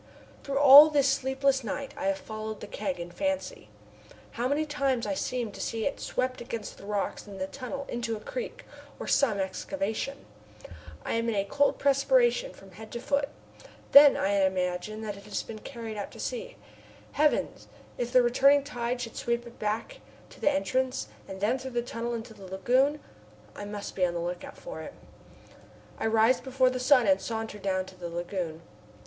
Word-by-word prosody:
Through 275 -1 -2
all 285 +2 +10
this 285 -2 +3
sleepless 270 0 +1
night 270 +6 -4
I 290 - -3
have 290 0 +1
followed 215 -3 -6
the - - -7
keg 195 -3 -4
in 170 0 -6
fancy. 285 - -3 0.6
How 240 +2 -1
many 290 +3 +1
times 275 -5 0
I - - -1
seem 250 -5 -2
to - - -8
see 225 -1 -2
it 280 - -2
swept 255 0 -2
against 230 -3 -6
the 200 - -11
rocks 205 0 -2
in 200 -1 -9
the 190 - -2
tunnel 275 +5 -6
into 235 -1 -3
a - - -7
creek, - - -6 0.3
or - - -5
some 240 -8 +3
excavation. 275 +7 -3 0.8
I - - -1
am 230 0 0
in 225 - -1
a 200 -1 +1
cold 285 +7 +2
perspiration 480 - +3
from 195 -1 -16
head 215 +4 -11
to 235 - -3
foot. 280 +3 0 0.6
Then 285 0 +9
I 190 - +1
imagine 185 +3 -1
that 205 -2 -4
it 200 - -13
has - - -3
been 220 -1 -8
carried 225 -2 -7
out 205 - -4
to - - -12
sea. - - -4 0.6
Heavens! 300 0 +1 0.3
if 240 0 -2
the 250 0 +6
returning 275 +4 +5
tide 245 -3 -3
should 230 - -6
sweep 235 0 -1
it 235 0 -13
back 210 +1 -3 0.3
to - - -15
the - - +4
entrance 260 -2 -1 0.2
and 190 0 -7
then 235 +6 +1
through 260 -1 -6
the 240 - +1
tunnel 235 0 -4
into 225 0 -7
the 195 - -12
lagoon! 255 +10 +2 0.6
I 205 - -6
must 205 0 -6
be 185 - 0
on 175 -1 +1
the - - -1
lookout 175 +1 -5
for - - -8
it. - - -9 1.0
I - - 0
rise 225 +3 +4
before 260 -1 +2
the 255 - -3
sun 255 -1 +5
and 195 -1 +3
saunter 220 -2 -4
down 185 -1 -1
to 190 - -13
the 175 -2 -6
lagoon. 170 -1 -4
240 Hz, 190 wpm, -28 LUFS, 205-275 Hz, 1.0 s, all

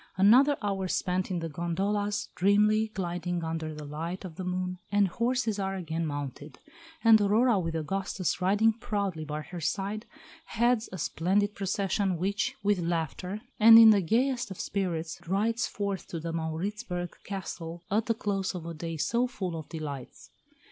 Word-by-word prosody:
Another 255 +9 +6
hour 195 -2 -1
spent 180 +1 -1
in 180 -3 -2
the 165 - -2
gondolas, 200 +6 -1
dreamily 210 +3 +3
gliding 175 -4 -3
under 160 -1 -3
the 150 -1 -8
light 165 +6 -5
of 170 -4 -8
the 185 - -5
moon, 180 0 -3
and 205 -1 +4
horses 235 +1 0
are 195 0 -1
again 165 -2 -3
mounted; 145 0 -6 0.5
and 225 -2 +7
Aurora, 215 +2 +3
with 165 -2 -3
Augustus 185 +3 -2
riding 205 +4 +4
proudly 200 -7 -3
by 150 +1 -4
her 175 +2 -8
side, 200 +6 -2 0.4
heads 235 -1 +1
the 185 - -8
splendid 195 +6 0
procession 195 -1 0
which, 200 +5 -1
with 205 -2 +2
laughter, 175 +4 -2 0.2
and 225 +1 +10
in 225 -1 +10
the 205 -2 +4
gayest 240 +6 +1
of 190 - -8
spirits, 175 -4 -2
rides 220 +5 +1
forth 200 -2 -3
to 170 - -5
the 165 +1 -4
Mauritzburg 175 +3 -3
Castle 170 -3 -6
at 215 +2 +1
the 230 - +2
close 195 -4 -2
of 170 -2 -6
a 170 - -5
day 165 +1 -5
so 240 +10 +1
full 185 -9 -4
of 160 -2 -7
delights. 145 -6 -7
190 Hz, 165 wpm, -29 LUFS, 165-210 Hz, 0.5 s, and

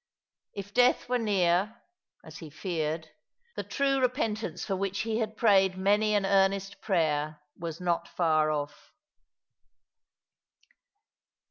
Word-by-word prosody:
If 200 0 -7
death 250 +2 +3
were 250 0 +1
near, 200 0 +1 0.4
as - - -11
he 160 - -9
feared, 160 -1 -3 0.5
the - - -2
true 275 -1 0
repentance 245 -4 -1
for 195 - -1
which 195 +1 -2
he 225 0 -1
had 220 -1 -3
prayed 195 -4 +4
maay 210 +2 +2
an 200 - 0
earnest 195 0 +1
prayer 155 -5 0 0.2
was 165 -2 -6
not 170 -1 -1
far 155 -3 +1
off. 145 -1 -4
195 Hz, 120 wpm, -28 LUFS, 165-215 Hz, 0.5 s, prayed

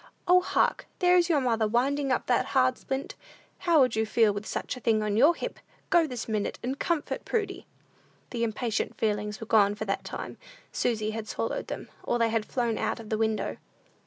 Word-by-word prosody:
O, 360 +1 +6
hark! - - +1
there 360 0 +4
is 350 -1 +4
your 315 -4 +4
mother 230 -4 +1
winding 270 +5 +1
up 255 - +1
that 245 - +2
hard 130 0 +4
splint! 270 +1 -4 0.5
How 335 -3 +4
would 255 -5 +4
you 220 - +2
feel 220 -1 +3
with 205 +1 -5
such - - -3
a - - -8
thing 220 -3 +2
on 210 -1 0
your 290 +10 +5
hip? - - -5 0.3
Go, 340 -3 +5
this 250 -4 -5
minute, 215 -2 -2
and 260 +3 -3
comfort 335 -4 -1
Prudy!" 415 -4 -2 0.6
The 235 -2 -2
impatient 225 0 -2
feelings 210 -1 -1
were 225 - -6
gone 205 -2 +4
for 215 - -4
that 195 - -2
time; - - -6 0.3
Susy 215 -3 0
had 220 0 -5
swallowed - - -3
them, - - -6
or 240 - 0
they 230 -1 +2
had 220 -1 -1
flown 240 -3 -1
out - - -1
of 220 -2 -10
the 220 - 0
window. 220 -1 0
230 Hz, 205 wpm, -28 LUFS, 215-275 Hz, 0.6 s, O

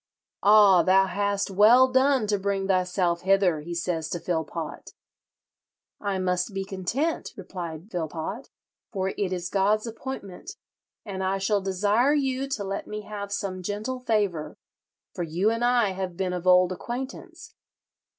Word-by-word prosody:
"'Ah, 205 -3 +7
thou 190 +2 +4
hast 200 +1 -1
well 225 +7 +6
done 260 -1 +3
to 205 -1 0
bring 195 0 -1
thyself 180 -2 +1
hither,' 190 -4 +3
he 170 +3 -6
says 170 -2 -2
to 175 - -3
Philpot. 160 -2 -4 1.0
'I 200 -2 -2
must 180 +2 -1
be 195 0 -2
content,' 210 - -2
replied 175 -1 -7
Philpot, 170 - -4 0.4
'for 190 -3 -1
it 195 -1 -2
is 180 -1 -3
God's 205 +3 +2
appointment, 230 - -7 0.5
and 190 -3 -4
I 190 +1 0
shall 200 +1 +1
desire 205 +9 +2
you 270 -1 0
to 255 -7 -3
let 195 0 -4
me 210 0 -5
have 205 -1 -7
some 190 -2 -3
gentle 210 +7 -4
favour, 205 -10 -1 0.6
for - - -5
you 175 +6 +1
and 230 +1 -2
I 240 -4 +3
have 185 -2 -5
been 185 -1 -1
of 180 0 -4
old 180 0 +6
acquaintance.' 275 - -7
195 Hz, 150 wpm, -26 LUFS, 180-215 Hz, 1.0 s, Ah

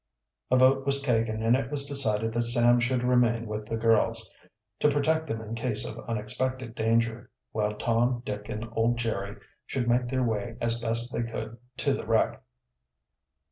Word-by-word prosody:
A 130 - +4
vote 130 +1 +4
was 140 0 +1
taken, 115 -4 0
and 115 +2 +4
it 130 -1 -2
was 140 -1 -3
decided 115 -6 -1
that 120 - +1
Sam 120 0 +6
should 125 0 0
remain 120 -2 +2
with 105 -1 -5
the 115 - -2
girls, 115 -1 +2 0.5
to 150 - +4
protect 160 +3 +1
them 110 - -3
in 110 0 -7
case 115 -1 -1
of 110 - -7
unexpected 125 +2 -3
danger, 115 0 0 0.2
while 105 -1 -1
Tom, 120 +3 0
Dick, 105 -2 -5
and 110 +2 -4
old 115 +1 +1
Jerry 105 -4 -3 0.3
should 125 -3 -2
make 120 +1 +2
their 130 +1 0
way 115 0 -2
as 115 0 -1
best 115 +2 +1
they - - -1
could 115 -1 -5 0.2
to - - +1
the - - -5
wreck. - - +1
115 Hz, 180 wpm, -27 LUFS, 110-125 Hz, 0.5 s, Sam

